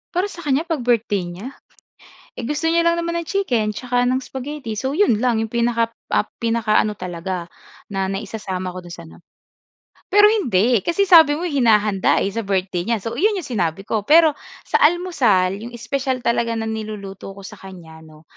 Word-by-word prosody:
Para 380 +3 0
sa 345 - -11
kanya 290 -2 0
'pag 330 -3 -2
birthday 225 -6 0
niya, 185 +9 -8 0.9
eh, 245 - -5
gusto 300 +5 -1
niya 335 0 +2
lang 340 0 +2
naman 340 0 -2
ng 340 - -4
chicken 245 - 0
tsaka 245 +1 0
ng 255 +1 +1
spaghetti. 265 -3 -6
So 265 +5 -2
yun 315 - +3
lang 235 -1 +1
yung 225 - -3
pinaka 235 0 +1 0.2
ap - - +1
pinakaano 225 -2 +1
talaga 180 -2 -5 0.4
na 195 -1 -2
naisasama 195 -1 -4
ko 180 - -8
dun 175 -1 -9
sa 175 - -9
ano. 170 - -18 0.8
Pero 415 +2 +6
hindi 240 - +2
kasi 340 - 0
sabi 325 -6 +7
mo 325 - -5
hinahanda 215 - +2
eh 200 - -1
sa 230 +3 -3
birthday 185 -2 -1
niya 230 -1 +1
so 230 +2 -4
yun 420 +4 +3
yung 375 - -4
sinabi 190 -6 -2
ko. 210 0 -3
Pero 320 0 +6 0.3
sa - - 0
almusal 240 - +1
yung 235 +2 -8
espesyal 255 +2 -3
talaga 235 -1 0
na 225 - -2
niluluto 210 -3 -6
ko 200 - -12
sa 200 +1 -10
kanya 175 -4 -12
'no, 155 -1 -17
230 Hz, 185 wpm, -20 LUFS, 195-290 Hz, 0.9 s, sabi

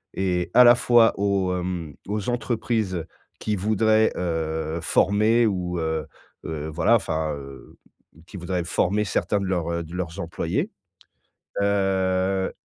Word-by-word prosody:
et 90 -2 -1
à 125 - +8
la 120 - +8
fois 120 -2 +4
aux, 100 -2 0
hem, 90 -4 -4 0.2
aux 105 0 -2
entreprises 110 -7 -1 0.3
qui 105 -1 -1
voudraient, 110 +2 +2
heu, 80 -2 -2
former 110 +6 +3
ou, 90 -4 -1
heu, 80 -1 -2 0.4
heu, 80 -1 -4
voilà, 115 +8 +3
enfin, 80 -7 -1
heu, 70 -1 -12 0.5
qui 90 - -13
voudraient 90 0 -2
former 100 +5 0
certains 100 0 0
de 100 - -3
leurs, 85 -3 -1
heu, 85 0 -2
de 80 +2 -12
leurs 85 -2 -4
employés. 85 - -2 0.9
Heu, 95 -1 +1
95 Hz, 135 wpm, -24 LUFS, 85-105 Hz, 0.9 s, à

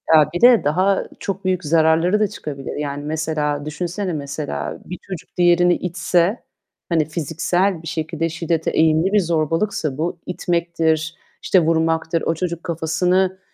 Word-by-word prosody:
Ya, 155 -2 +5
bir 175 - -3
de 245 -2 +7
daha 185 +7 +2
çok 195 -1 -4
büyük 185 -2 0
zararları 165 +5 +3
da 210 - +3
çıkabilir. 140 -7 -7
Yani, 145 -1 -4
mesela 150 -1 -2
düşünsene, 175 +5 -3
mesela 145 0 -4
bir 180 - -6
çocuk 185 -4 -8
diğerini 175 0 +4
itse 180 +3 0 0.5
hani 165 -3 +2
fiziksel 165 +4 -1
bir 165 - -7
şekilde 165 +1 -2
şiddete 165 0 -1
eğilimli 160 +4 +2
bir 210 - +5
zorbalıksa 165 -3 -1
bu, 165 +3 -2
itmektir, 170 -2 -1 0.3
işte, 185 - +4
vurmaktır. 165 0 +1
O - - 0
çocuk 170 0 -3
kafasını, 180 +3 0
165 Hz, 140 wpm, -20 LUFS, 155-180 Hz, 0.5 s, de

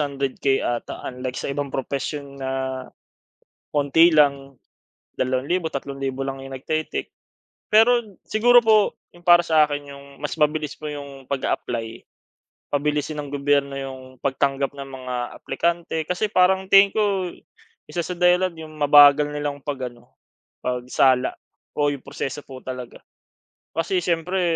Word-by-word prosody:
100K 140 -1 0
'ata. 120 -1 -3
Unlike 125 0 -5
sa - - -3
ibang 140 0 -3
propesyon 140 +1 -4
na 130 - -3 1.2
konti 150 +4 +5
lang. 140 -2 +3 0.6
2,000, 130 +7 0
3,000 135 -1 -4
lang 135 0 -5
'yong 135 0 -9
nag-te-take. 155 +4 -3 0.6
Pero 225 -2 +4
siguro 240 +3 +5
po 215 -2 +4 0.2
'yong 175 0 -19
para 175 -1 +7
sa 155 -2 +5
akin 145 -1 -5
'yong 140 0 -12 0.2
mas 150 - -3
mabilis 150 -1 +1
po - - -10
'yong 140 -2 -8
pag-a-apply 115 -4 -3 0.7
pabilisin 150 +1 -1
ng 145 -1 -6
gobyerno 140 0 +1
'yong 130 -1 -8
pagtanggap 140 0 0
ng 140 -1 -7
mga 130 -1 -6 0.2
aplikante. 170 +2 -2
Kasi 180 +4 0
parang 190 0 +3
tingin 195 0 +7
ko 200 -4 +1 0.6
isa 175 - -3
sa 180 - -4
dahilan 180 +1 +3
'yong 155 -1 -9
mabagal 145 0 +7
nilang 145 -1 -3
pag-ano, 130 -4 -6 0.5
pagsala 125 +1 +2 0.4
o 145 0 +2
'yong 140 - -8
proseso 135 +2 -5
po 130 -1 -10
talaga. 125 -2 -7 0.7
Kasi 170 +3 0
siyempre 175 +2 0
145 Hz, 130 wpm, -23 LUFS, 135-170 Hz, 1.2 s, para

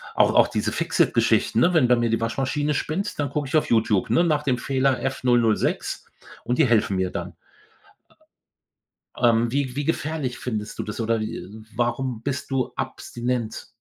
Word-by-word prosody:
auch - - +4
auch - - +6
diese - - -2
Fix-it-Geschichten, 110 - +2
ne, 175 +8 +4
wenn 135 -7 +4
bei 125 - +6
mir 120 -1 +1
die 115 0 0
Waschmaschine 140 +5 -1
spinnt, 190 +7 -3
dann 145 - 0
gucke 145 -2 -2
ich 155 - -2
auf - - 0
YouTube, 110 -4 +2
ne, 170 - +4
nach 150 -3 +1
dem 130 -4 +1
Fehler 130 0 +1
„F006“ 120 -4 0 0.4
und 120 +1 0
die 155 - +6
helfen 110 -4 +2
mir 95 -1 0
dann. - - -6 1.8
Ähm, 115 -1 +3
wie 135 -2 -1
wie 145 - -1
gefährlich 150 -5 -2
findest 105 -4 -4
du - - -1
das 105 +2 -6
oder, 115 0 0
äh, 110 -3 -5 0.3
warum 120 -1 -1
bist 140 +1 -4
du 130 -2 -1
abstinent? 120 -2 -4
125 Hz, 170 wpm, -24 LUFS, 115-140 Hz, 1.8 s, auch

